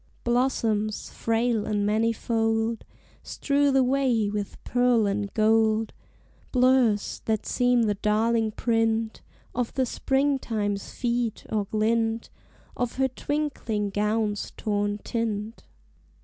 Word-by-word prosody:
Blossoms, 230 -4 0
frail 230 -1 0
and 205 -1 0
manifold, 225 +1 0 0.4
Strew 285 0 +1
the 270 -1 +4
way 250 -5 +1
with 205 -1 -4
pearl 245 -3 +2
and 200 0 -1
gold; 220 0 +2 0.6
Blurs, 250 -4 +2
that 220 -2 -1
seem 245 -1 +2
the 210 -2 +2
darling 220 +2 +1
print 225 -1 0 0.3
Of 245 -1 -2
the 260 - +2
Springtime's 240 -7 -1
feet, 240 -2 -2
or 210 -2 0
glint 225 +2 0 0.4
Of 245 -1 -2
her 265 0 +1
twinkling 260 -7 -2
gown's 210 0 -1
torn 205 -1 -1
tint. 225 -1 -3
225 Hz, 105 wpm, -26 LUFS, 215-245 Hz, 0.6 s, the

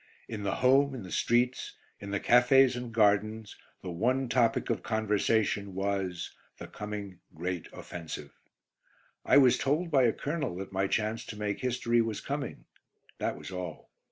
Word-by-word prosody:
In 110 -2 -5
the 100 - -1
home, 135 +2 +4
in 120 - -6
the 90 - -9
streets, 120 +2 +1 0.2
in 100 - -8
the 100 0 -1
cafés 125 +2 +5
and 125 -1 -5
gardens, 110 0 +2 0.3
the 90 - -4
one 125 +8 0
topic 115 -1 +2
of - - -1
conversation 105 -2 0
was 95 -3 -2 0.2
the - - -8
coming 105 -3 -7 0.2
Great 90 +1 -3
Offensive. 85 -2 -8 0.9
I - - +5
was 130 -3 +6
told 155 +5 0
by 135 -4 +5
a 115 - +4
colonel 145 - -3
that 95 +1 -7
my 95 +1 +1
chance 110 +2 -1
to - - -7
make 105 -1 -2
history 120 -2 +1
was 110 -2 -2
coming. 140 -2 -5 0.5
That - - -1
was - - -9
all. 90 -3 -7
110 Hz, 160 wpm, -30 LUFS, 100-125 Hz, 0.9 s, was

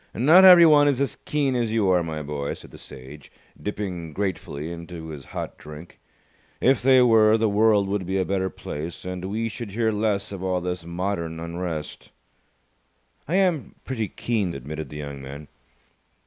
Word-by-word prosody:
"Not 160 +10 +6
everyone 165 -5 +8
is 140 -3 +1
as 140 - -1
keen 140 -3 0
as 120 -3 0
you 110 -3 +1
are, 90 -1 +4
my 80 -2 -4
boy," 70 -1 -4
said - - -14
the - - -13
Sage, 65 +2 -12 0.3
dipping 90 -6 -5
gratefully 85 -5 -4
into 85 -1 -8
his 75 -3 -8
hot - - -7
drink. 75 +3 -12 0.6
"If 130 0 +3
they 130 0 +6
were, 110 -2 +5
the 110 0 +1
world 105 -1 +3
would 100 -2 -2
be 95 +1 -1
a 95 - +1
better 95 0 -1
place, 80 0 -7
and 90 0 -5
we 110 +4 -2
should 115 -2 -7
hear 110 0 +1
less 105 -2 -1
of 100 -2 -6
all 95 -1 0
this 90 -1 -4
modern 85 -2 -3
unrest." 85 -2 -5 1.2
"I 165 - -1
am 180 -7 +1
pretty 115 -5 -3
keen," 100 -3 -2
admitted 75 +2 -6
the 75 - -8
young 70 -2 -7
man. 70 +2 -9
95 Hz, 175 wpm, -24 LUFS, 80-115 Hz, 1.2 s, everyone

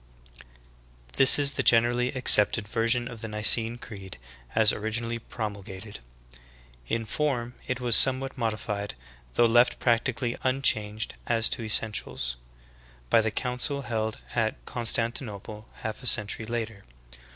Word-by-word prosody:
18. - - -17 0.8
This 135 - +6
is 140 -1 +2
the - - -2
generally 120 +1 +3
accepted 115 -4 +4
version 115 +2 0
of 120 -3 -9
the 115 - -5
Xicene 110 +2 +4
Creed 100 -5 -10 0.4
as 110 -1 +4
originally 115 +2 -3
promulgated. 105 -3 -7 0.9
In 115 - -2
form 125 -1 -2
it 125 -1 -2
was 120 -3 +3
somewhat 135 0 +5
modified, 105 - -3 0.4
though 120 - +4
left 120 +2 +3
practically 120 0 0
unchanged 110 -5 0
as 115 -1 +2
to - - -1
essentials, 105 - -1 0.7
by - - +5
the 110 - -1
council 125 +5 -1
held 110 -2 -3 0.2
at 110 -2 -2
Constantinople 115 -2 -3
half 110 +2 -6
a 125 - -4
century 105 0 +1
later. 115 -3 -4
115 Hz, 130 wpm, -26 LUFS, 105-120 Hz, 0.9 s, This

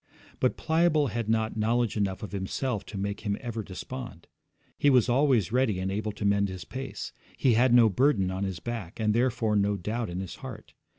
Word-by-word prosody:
But - - +1
Pliable 160 -3 +2
had 115 0 -3
not 110 0 +1
knowledge 115 +1 +1
enough 100 -2 -1
of 105 - -6
himself 105 +3 -2
to 105 - -7
make 100 +1 -2
him 105 -2 -2
ever 115 -3 -4
despond. 110 0 -7 0.5
He 145 - +3
was 125 -5 +5
always 125 - +3
ready 125 -5 +2
and 95 +1 -2
able 105 +2 -2
to 105 - -5
mend 100 0 +3
his 95 -3 -7
pace. 130 +4 -6 0.2
He 130 - +3
had 120 +3 +4
no 120 -2 +7
burden 105 -3 +2
on 95 +1 -2
his 95 -3 -3
back, 115 -5 -6
and 105 -1 +2
therefore 115 -2 +1
no 100 0 +2
doubt 110 +4 -3
in 90 +1 -4
his 95 -2 -6
heart. 125 -5 -9
110 Hz, 200 wpm, -28 LUFS, 100-125 Hz, 0.5 s, no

